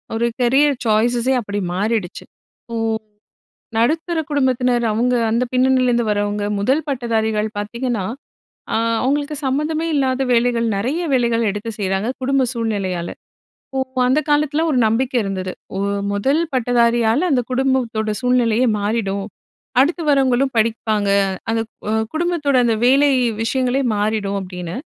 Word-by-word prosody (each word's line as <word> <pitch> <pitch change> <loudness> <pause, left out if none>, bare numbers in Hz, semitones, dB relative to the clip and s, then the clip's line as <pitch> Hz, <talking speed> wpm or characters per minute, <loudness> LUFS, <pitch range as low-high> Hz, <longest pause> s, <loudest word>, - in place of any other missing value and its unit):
ஒரு 230 +1 +1 0.2
கரியர் 275 +4 +3
சாய்ஸஸே 235 +3 +2
அப்படி 205 -1 -4
மாறிடுச்சு. 205 -1 -2 0.4
இப்போ, 230 - -8 1.0
நடுத்தர 320 +8 +1
குடும்பத்தினர் 255 -4 +1
அவுங்க 245 +3 +1
அந்த 230 +3 +1
பின்னணியிலேருந்து 255 -2 +2
வரவுங்க, 205 0 -1 0.2
முதல் 265 +10 +1
பட்டதாரிகள் 220 -5 0
பார்த்தீங்கன்னா, 235 +1 -2 0.7
அ - - +2 0.3
அவுங்களுக்கு 290 +3 0
சம்மந்தமே 305 +4 -1
இல்லாத 265 -2 +1
வேலைகள் 235 -1 +2
நெறைய 260 - -1
வேலைகள் 235 -3 +2
எடுத்து 210 +3 -5
செய்றாங்க, 195 +2 -1
குடும்ப 270 0 +2
சூழ்நிலையால. 195 -7 -2 0.7
ஓ - - +1 0.3
அந்த 260 +4 +3
காலத்தில 295 +1 +2
ஒரு 280 - +1
நம்பிக்கை 250 +3 0
இருந்தது. 190 -2 -3 0.3
"ஒரு 200 +1 -1 0.2
முதல் 270 +10 +1
பட்டதாரியால 240 +3 +2
அந்த 255 -3 +3
குடும்பத்தோட 250 -4 0
சூழ்நிலையே 250 -1 +2
மாறிடும். 200 -2 -1 0.5
அடுத்து 325 +6 +2
வரவங்களும் 270 -1 +2
படிப்பாங்க. 220 -2 0 0.4
அந்த 225 0 +1
க் - - -84 0.2
அ - - +1 0.2
குடும்பத்தோட 315 -4 0
அந்த 230 -2 +2
வேலை 275 +3 +5 0.3
விஷயங்களே 255 +2 0
மாறிடும்" 205 -1 -1
அப்படின்னு. 180 -2 -6
240 Hz, 125 wpm, -19 LUFS, 215-265 Hz, 1.0 s, வேலை